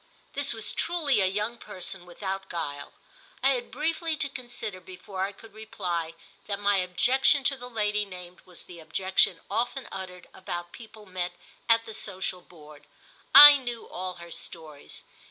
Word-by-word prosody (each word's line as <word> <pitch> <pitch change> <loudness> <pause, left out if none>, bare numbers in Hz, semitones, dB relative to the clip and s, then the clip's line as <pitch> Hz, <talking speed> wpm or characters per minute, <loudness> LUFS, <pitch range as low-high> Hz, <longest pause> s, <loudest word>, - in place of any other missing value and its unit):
This 285 -1 +3
was 225 -2 0
truly 315 - +1
a 190 - +4
young 210 +5 -2
person 180 0 -3
without 195 +2 -5
guile. 145 -4 -5 0.5
I 270 - +5
had 250 -3 -1
briefly 320 +3 -1
to 290 - 0
consider 240 -7 -6
before 185 +1 -6
I 200 - -5
could 210 +1 -16
reply 175 -7 -4 0.3
that 200 -1 -2
my 205 -1 +2
objection 255 - +3
to 275 - +2
the 250 -1 -8
lady 210 -2 0
named 180 -2 -10
was 180 -2 -13
the 175 -1 -12
objection 175 +2 +2
often 245 +3 -2
uttered 180 -2 -7
about 175 -2 -6
people 220 -2 -12
met 185 -2 -4 0.4
at 230 0 +4
the 220 - -8
social 190 -3 -2
board—I 175 - +5
knew 245 -3 -5
all 185 0 -5
her 170 -1 -11
stories. 155 -3 -6
195 Hz, 155 wpm, -27 LUFS, 180-240 Hz, 0.5 s, I